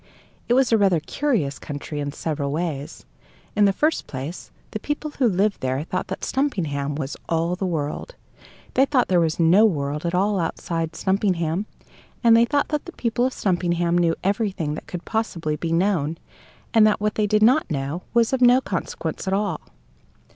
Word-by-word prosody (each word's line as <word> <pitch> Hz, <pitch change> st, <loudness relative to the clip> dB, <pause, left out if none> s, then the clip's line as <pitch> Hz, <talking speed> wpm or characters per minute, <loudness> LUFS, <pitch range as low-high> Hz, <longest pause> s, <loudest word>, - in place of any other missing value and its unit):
It 240 Hz, -, +4 dB
was 260 Hz, -2 st, +3 dB
a 225 Hz, -, +4 dB
rather 190 Hz, -5 st, +4 dB
curious 165 Hz, -, -1 dB
country 145 Hz, +1 st, -6 dB
in 145 Hz, 0 st, -2 dB
several 145 Hz, -2 st, -3 dB
ways. 155 Hz, -2 st, -4 dB, 0.5 s
In 205 Hz, 0 st, +5 dB
the 200 Hz, -, +5 dB
first 305 Hz, +10 st, 0 dB
place, 140 Hz, +6 st, -6 dB, 0.2 s
the 215 Hz, -, -4 dB
people 295 Hz, +4 st, -3 dB
who 255 Hz, -, +4 dB
lived 200 Hz, +2 st, +1 dB
there 130 Hz, +2 st, -1 dB
thought 185 Hz, +3 st, -3 dB
that -, -, -6 dB
Stumpinghame 155 Hz, -, -1 dB
was 140 Hz, -2 st, -4 dB
all 165 Hz, +2 st, +1 dB
the 190 Hz, +1 st, -2 dB
world; 160 Hz, -, -3 dB, 0.6 s
they 265 Hz, -, +4 dB
thought 265 Hz, -4 st, +2 dB
there 180 Hz, -2 st, +4 dB
was 165 Hz, -1 st, 0 dB
no 170 Hz, +6 st, +6 dB
world 150 Hz, -7 st, 0 dB
at 170 Hz, +1 st, -1 dB
all 200 Hz, +2 st, +2 dB
outside 165 Hz, -1 st, -2 dB
Stumpinghame. 190 Hz, -1 st, 0 dB, 0.6 s
And 230 Hz, -1 st, +7 dB
they 230 Hz, +1 st, +6 dB
thought 285 Hz, +3 st, 0 dB
that 300 Hz, -1 st, -2 dB
the 350 Hz, -, -9 dB
people 240 Hz, -1 st, 0 dB
of 260 Hz, -, -5 dB
Stumpinghame 175 Hz, -2 st, +1 dB
knew 170 Hz, -1 st, +2 dB
everything 195 Hz, -6 st, -1 dB
that 155 Hz, -, -7 dB
could 180 Hz, -1 st, -6 dB
possibly 170 Hz, -9 st, -2 dB
be 165 Hz, +2 st, -3 dB
known, 165 Hz, -3 st, +1 dB, 0.6 s
and 220 Hz, -2 st, +6 dB
that 215 Hz, -, +2 dB
what 210 Hz, 0 st, 0 dB
they 210 Hz, -1 st, +1 dB
did 215 Hz, +1 st, +3 dB
not 255 Hz, +7 st, +4 dB
know 145 Hz, +3 st, -3 dB
was 235 Hz, +1 st, +2 dB
of 260 Hz, -, +1 dB
no 245 Hz, +1 st, +7 dB
consequence 260 Hz, -, -4 dB
at 190 Hz, -, +2 dB
all. 205 Hz, 0 st, -1 dB
180 Hz, 185 wpm, -23 LUFS, 160-220 Hz, 0.6 s, And